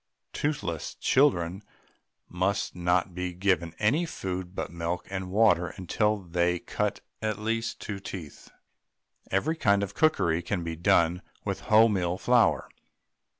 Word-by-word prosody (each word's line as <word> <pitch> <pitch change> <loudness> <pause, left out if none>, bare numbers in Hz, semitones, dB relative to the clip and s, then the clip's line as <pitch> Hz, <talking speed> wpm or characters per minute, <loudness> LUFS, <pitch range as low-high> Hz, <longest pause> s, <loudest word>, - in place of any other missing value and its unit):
Toothless 100 - -2
children 95 - +2 0.7
must 95 +3 -1
not 90 +1 +1
be 90 0 -3
given 90 -3 0
any 125 +11 +2
food 95 - -5
but - - -4
milk 85 +1 -3
and 95 -1 -4
water 100 -3 +4
until 105 +4 +1
they 90 0 +1
cut - - -2 0.2
at 110 -2 -1
least 115 +1 -2
two 100 -2 -5
teeth. 90 -6 -9 0.8
Every 145 - +1
kind 100 -9 +2
of 100 0 -4
cookery 90 - +2
can 90 0 -2
be 85 -1 -4
done 85 +1 +3 0.2
with - - -3
wholemeal 100 -5 +4
flour. 120 +4 +3
95 Hz, 130 wpm, -28 LUFS, 85-105 Hz, 0.8 s, water